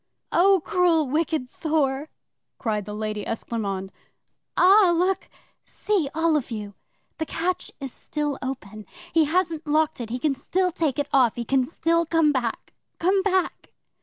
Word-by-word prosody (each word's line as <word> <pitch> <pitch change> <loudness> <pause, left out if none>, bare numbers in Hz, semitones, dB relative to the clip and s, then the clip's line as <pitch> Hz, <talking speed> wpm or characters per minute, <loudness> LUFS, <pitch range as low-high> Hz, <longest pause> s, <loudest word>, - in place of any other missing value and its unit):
'"Oh, 375 0 +4
cruel, 350 -6 +3
wicked 305 -1 0
Thor!" 295 -1 -1 0.5
cried 210 -4 -2
the 210 - -6
Lady 215 -1 -3
Esclairmonde. 200 -4 -3 0.7
"Ah, 380 0 +6
look 365 +2 0 0.3
see, 385 -9 -1
all 325 0 +2
of 290 -5 -1
you! 210 -3 -5 0.5
The 315 - -2
catch 360 +2 -2
is 270 -3 -6
still 295 -2 -3
open! 215 -6 -6 0.3
He 325 -2 +5
hasn't 325 -1 0
locked 310 -2 +1
it. 230 - -5
He 245 - -2
can 285 +2 +1
still 365 +7 0
take 320 -6 -1
it 290 - 0
off. 255 -5 +4
He 235 - -4
can 270 +2 +2
still 335 +4 0
come 325 -2 +3
back. 245 -5 -3 0.2
Come 380 +3 +2
back!" 375 -2 -1
300 Hz, 155 wpm, -24 LUFS, 245-335 Hz, 0.7 s, Ah